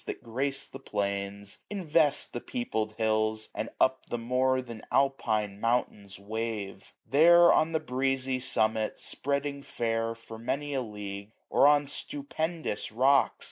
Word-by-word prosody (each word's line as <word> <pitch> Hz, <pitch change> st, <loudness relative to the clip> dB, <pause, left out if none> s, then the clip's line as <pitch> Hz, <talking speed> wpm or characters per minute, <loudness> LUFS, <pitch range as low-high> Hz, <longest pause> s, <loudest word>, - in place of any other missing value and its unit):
That -, -, -5 dB
gra/:e 135 Hz, +4 st, -1 dB, 0.2 s
the 135 Hz, -, -8 dB
plains, 100 Hz, -3 st, -3 dB
invest 160 Hz, -7 st, +1 dB
the -, -, -4 dB
peopled 110 Hz, -, -3 dB
hills. 110 Hz, 0 st, 0 dB
And -, -, -3 dB
up 130 Hz, 0 st, +2 dB
the 120 Hz, -, -2 dB
more 130 Hz, +2 st, +1 dB
than 115 Hz, -3 st, -9 dB
Alpine 110 Hz, -7 st, +1 dB
mountains 105 Hz, -4 st, -1 dB
wave. 105 Hz, -1 st, -5 dB
There 170 Hz, +4 st, +7 dB
on 160 Hz, -, +3 dB
the 160 Hz, -, +1 dB
breezy 135 Hz, -2 st, -1 dB
summit, 110 Hz, -3 st, 0 dB
spreading 140 Hz, 0 st, -2 dB
fair, 115 Hz, -4 st, -2 dB
765 115 Hz, -, -20 dB
For 115 Hz, 0 st, -8 dB
many 145 Hz, +5 st, -2 dB
a 135 Hz, -, 0 dB
league; 105 Hz, -2 st, -7 dB, 0.2 s
or 140 Hz, -, +6 dB
on 145 Hz, 0 st, +5 dB
stupendous 150 Hz, -2 st, -3 dB
rocks. 130 Hz, +4 st, +4 dB
125 Hz, 140 wpm, -29 LUFS, 110-140 Hz, 0.2 s, There